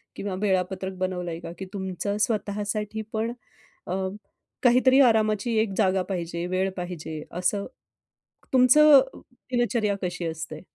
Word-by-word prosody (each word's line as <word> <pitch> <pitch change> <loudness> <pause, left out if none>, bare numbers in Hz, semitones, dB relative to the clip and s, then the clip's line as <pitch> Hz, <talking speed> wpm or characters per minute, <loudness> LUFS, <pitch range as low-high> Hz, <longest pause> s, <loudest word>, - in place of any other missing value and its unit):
किंवा 200 -1 -4
वेळापत्रक 190 -1 -1
बनवलंय 180 -3 -3
का? 165 - -8
की 190 - -5
तुमचं 195 +1 -3
स्वतःसाठी 210 0 -1
पण 225 +2 -1 0.6
अ, 180 - -2 0.7
काहीतरी 255 +2 +5
आरामाची 220 -1 +3
एक 220 -2 +1
जागा 190 0 +2
पाहिजे, 170 -2 -3
वेळ 185 +1 0
पाहिजे 165 -3 -5
असं. 180 +3 -1 0.9
तुमचं 275 +3 +7 0.5
दिनचर्या 235 -4 +1
कशी 175 -1 -3
असते? 160 -1 -5
195 Hz, 115 wpm, -25 LUFS, 180-220 Hz, 0.9 s, तुमचं